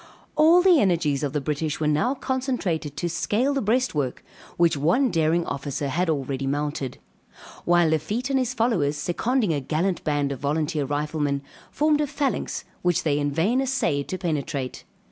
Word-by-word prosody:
All 335 +3 +6
the 365 -5 +6
energies 165 - +1
of 145 -2 -1
the 150 - -1
British 150 +1 -2
were 155 - -1
now 155 - +1
concentrated 240 - -2
to 175 - -1
scale 215 - 0
the 275 - 0
breastwork, 205 - 0 0.3
which 170 -2 +3
one 175 - +2
daring 165 +1 +2
officer 140 +1 -3
had 175 +5 0
already 135 -2 -2
mounted. 145 -2 -2 0.7
While 175 -1 +4
Lafitte 210 - -1
and 270 - +3
his 255 0 -1
followers, 180 - +1
seconding 205 - 0
a 145 - 0
gallant 170 +7 -1
band 145 -2 0
of 135 - -5
volunteer 150 +1 -1
riflemen, 145 0 -1 0.3
formed 300 0 +2
a 295 - 0
phalanx 280 -1 -2 0.2
which 175 -2 +1
they 145 -2 +1
in 145 0 0
vain 195 - +1
assayed 250 - 0
to 185 - -3
penetrate. 145 -7 -3
160 Hz, 165 wpm, -24 LUFS, 145-240 Hz, 0.7 s, All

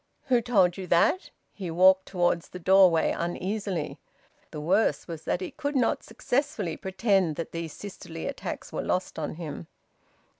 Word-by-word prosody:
"Who 245 -2 +4
told 195 -7 +3
you 190 -1 -6
that?" 180 - +3 0.2
He 190 -4 -6
walked 185 +3 +5
towards 175 -2 0
the - - -8
doorway 180 -2 +5
uneasily. 185 0 -3 0.5
The 150 - -7
worst 190 +9 +1
was 165 -3 -7
that 180 - 0
he 185 - -4
could 285 -1 -4
not 250 -4 +2
successfully 235 - -2
pretend 190 -4 +1
that 165 - -5
these 165 -2 -5
sisterly 170 -5 -8
attacks 280 - -5
were - - -1
lost 185 -2 -2
on 155 0 -3
him. 160 -1 -7
185 Hz, 155 wpm, -27 LUFS, 170-210 Hz, 0.5 s, walked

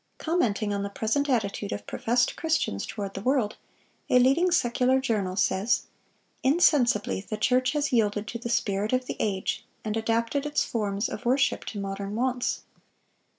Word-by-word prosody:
Commenting 225 - 0
on 200 - -1
the 200 - -3
present 230 +8 -1
attitude 205 -4 -1
of 205 - -5
professed 240 +1 0
Christians 310 - -1
toward 200 -2 -5
the 195 - -5
world, 250 -3 +1 0.5
a - - +5
leading 275 +9 +4
secular 255 -5 +2
journal 210 -8 -1
says: 195 +3 +1 0.6
"Insensibly 260 - +3
the 210 +2 -5
church 255 +5 +2
has 295 -2 0
yielded 210 -2 +2
to 235 - -5
the 235 - -5
spirit 210 -1 0
of 255 0 +1
the - - -4
age, 195 -3 -1 0.2
and 215 0 -1
adapted 230 +4 0
its 295 - +1
forms 205 -2 -1
of - - -6
worship 260 +3 +1
to 205 - -5
modern 195 +1 -4
wants." 250 +1 -1
230 Hz, 160 wpm, -27 LUFS, 205-255 Hz, 0.6 s, a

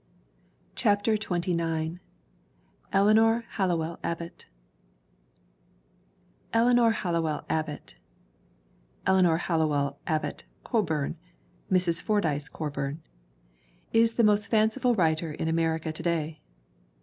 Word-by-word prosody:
CHAPTER 205 +2 +2
XXIX 170 -4 -2 0.9
ELEANOR 220 +3 +4
HALLOWELL 170 -4 -1
ABBOTT 170 0 -5 2.1
ELEANOR 240 0 +5
HALLOWELL 170 -7 -1
ABBOTT 155 - -3 1.1
(Eleanor 180 -4 +4
Hallowell 150 -5 0
Abbott 155 -2 -2 0.2
Coburn: 165 - -1 0.5
Mrs. 180 -3 +2
Fordyce 155 -9 0
Co 155 -2 -4
burn) 140 +3 -4 0.9
is 230 0 +4
the 235 - +3
most 210 -1 +3
fanciful 225 +3 +2
writer 160 -3 +1
in 160 - -3
America 160 0 0
to - - -5
day. 160 -2 -2
170 Hz, 90 wpm, -27 LUFS, 160-210 Hz, 2.1 s, ELEANOR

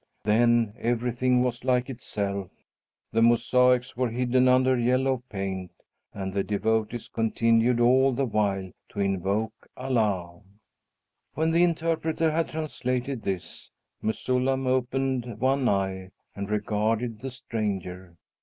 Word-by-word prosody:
Then 115 +1 +3
everything 125 +1 +1
was 120 -1 -2
like 125 -1 +1
itself. 100 -6 -4 0.6
The 115 - +2
mosaics 125 +2 +3
were 125 0 0
hidden 125 +2 +2
under 130 0 +4
the 120 - -1
yellow 130 +1 +1
paint 95 -2 -4 0.4
and 95 -1 -5
the 100 0 0
devotees 110 +2 -1
continued 115 +1 +2
all 130 +3 +5
the 135 +2 0
while 100 -4 -1 0.2
to 100 - -8
invoke 100 +3 0 0.2
Allah." 105 -9 -1 0.9
When 160 +1 +1
the 170 +2 +4
interpreter 165 -1 +1
had 165 +1 0
translated 130 -5 -3
this, 95 -4 -5 0.3
Mesullam 130 +4 0
opened 130 -2 -1
one 130 +1 +2
eye 95 -1 -1 0.3
and 100 0 -5
regarded 110 +2 -1
the 135 - -4
stranger. 95 -7 -5
120 Hz, 120 wpm, -26 LUFS, 105-130 Hz, 0.9 s, all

